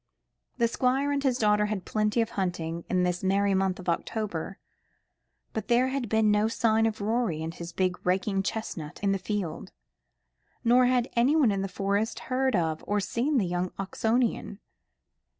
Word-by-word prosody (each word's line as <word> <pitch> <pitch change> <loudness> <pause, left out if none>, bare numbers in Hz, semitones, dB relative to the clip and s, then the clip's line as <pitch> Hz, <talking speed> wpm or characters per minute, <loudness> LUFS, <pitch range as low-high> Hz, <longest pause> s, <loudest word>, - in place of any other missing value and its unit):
The 235 -2 +3
Squire 260 +4 +1
and 285 -1 0
his 260 -3 +1
daughter 210 -2 +3
had 210 -3 -3
plenty 215 +2 +1
of 225 - -2
hunting 170 -3 -3
in 180 -1 +2
this 180 0 -1
merry 195 +1 +2
month 190 -1 +1
of 185 - -10
October, 190 0 -2 1.0
but 220 - -4
there 245 +2 +3
had 260 -4 -3
been 220 -1 +3
no 210 +1 +3
sign 225 0 +2
of 220 -1 -4
Rorie 210 -7 0
and 165 +1 -4
his 170 0 -8
big 180 +1 -1
raking 190 +2 +1
chestnut 190 -7 -5
in 200 - +3
the 195 - 0
field, 195 -3 -4 0.9
nor 245 +2 +5
had 250 -1 +2
anyone 260 +1 +4
in 195 -1 -1
the 195 - -2
Forest 200 +3 -1 0.2
heard 260 -1 +2
of 160 -3 -1
or 205 +1 +1
seen 250 +8 0
the 210 - +2
young 180 +1 -1
Oxonian. 220 +2 -1
210 Hz, 170 wpm, -27 LUFS, 185-235 Hz, 1.0 s, nor